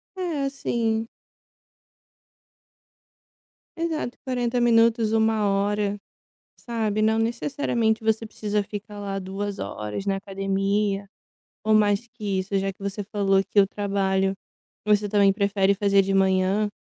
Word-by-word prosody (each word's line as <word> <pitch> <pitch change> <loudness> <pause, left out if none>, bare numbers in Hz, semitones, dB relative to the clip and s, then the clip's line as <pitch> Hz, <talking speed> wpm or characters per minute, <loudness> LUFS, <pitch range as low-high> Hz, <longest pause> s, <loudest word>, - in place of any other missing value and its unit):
É 345 -6 -2
assim. 230 -4 -1 2.7
Exato, 320 -7 -2
40 245 -1 0
minutos, 230 -1 +3
1 220 -1 +2
hora, 205 +1 0 0.6
sabe, 220 -3 -2
não 220 +1 +3
necessariamente 230 -1 0
você 220 0 +1
precisa 210 -1 -2
ficar 205 +1 -8
lá 200 -1 -3
2 195 +1 -4
horas 105 - -5
na 195 -1 +1
academia 195 +1 -1 0.6
ou 215 0 +3
mais 210 +1 +3
que 210 -5 -3
isso, 190 +1 -2
já 195 0 0
que 185 - -34
você 200 +1 -3
falou 195 -1 +2
que 200 +1 +3
o 195 - +4
trabalho 195 -1 0 0.5
você 210 0 +3
também 200 -1 +4
prefere 200 -1 +2
fazer 200 0 +3
de 195 0 -1
manhã, 190 +2 +2
205 Hz, 125 wpm, -24 LUFS, 195-225 Hz, 2.7 s, o